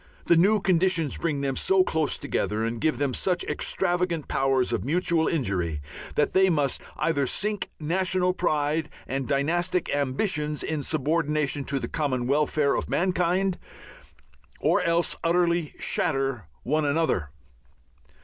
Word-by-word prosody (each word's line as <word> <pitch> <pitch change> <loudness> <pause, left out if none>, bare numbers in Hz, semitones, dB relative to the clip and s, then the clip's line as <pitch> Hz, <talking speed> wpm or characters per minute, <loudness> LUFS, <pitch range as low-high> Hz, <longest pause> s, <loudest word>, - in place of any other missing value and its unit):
The 170 - +5
new 200 +6 +4
conditions 180 -5 +1
bring 150 -4 -1
them 135 -1 -1
so 190 +5 +3
close 160 -4 -1
together 110 +1 -2
and 115 0 -3
give 155 - +1
them 140 -2 -1
such 180 +4 0
extravagant 175 -3 -1
powers 135 -2 +1
of - - -1
mutual 165 +2 +1
injury 95 - -1 0.4
that 150 - +1
they 190 0 +5
must 145 -5 0 0.2
either 145 -3 +1
sink 210 +5 -1
national 180 +3 +1
pride 155 -3 0 0.2
and 135 0 -3
dynastic 175 +6 0
ambitions 150 +2 -1
in 155 -2 -2
subordination 150 -1 0
to 140 - 0
the - - -4
common 130 -6 -1
welfare 145 +1 +2
of - - -2
mankind 180 +1 +1 1.0
or - - +2
else 170 0 +1
utterly 170 -2 +1
shatter 135 - -1 0.2
one 155 +4 +1
another. 145 - 0
155 Hz, 135 wpm, -26 LUFS, 140-175 Hz, 1.0 s, The